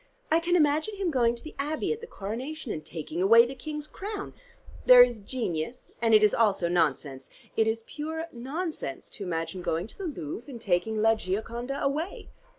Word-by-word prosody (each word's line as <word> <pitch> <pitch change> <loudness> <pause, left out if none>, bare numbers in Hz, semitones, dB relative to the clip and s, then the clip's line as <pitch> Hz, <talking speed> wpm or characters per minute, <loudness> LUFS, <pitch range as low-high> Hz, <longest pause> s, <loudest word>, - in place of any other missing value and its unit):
I 325 - +5
can 345 +1 +1
imagine 310 +5 +2
him 385 -4 -1
going 240 -4 +3
to 235 - -12
the 310 - -9
Abbey 300 +8 -1
at 455 - -8
the 465 - -8
Coronation, 250 - -5
and 155 - -4
taking 160 +2 -5
away 230 +5 +7
the 250 - -5
King's 300 +3 -5
crown. 405 +5 -6 0.5
There 250 -1 +11
is 240 -2 -1
genius, 205 -2 -4
and 225 -2 +5
it 215 - +6
is 210 - +5
also 205 -6 +3
nonsense. 145 -6 0 0.3
It 220 - +3
is 225 0 -1
pure 320 +2 -4
nonsense 270 - -5
to 205 - -7
imagine 165 0 -3
going 165 -1 -1
to 220 - -13
the 385 - -3
Louvre 240 - -6
and 245 -4 -7
taking 215 +2 0
'la 225 0 +6
Gioconda' 235 +7 -3
away." 300 +7 -2
235 Hz, 190 wpm, -28 LUFS, 195-305 Hz, 0.5 s, There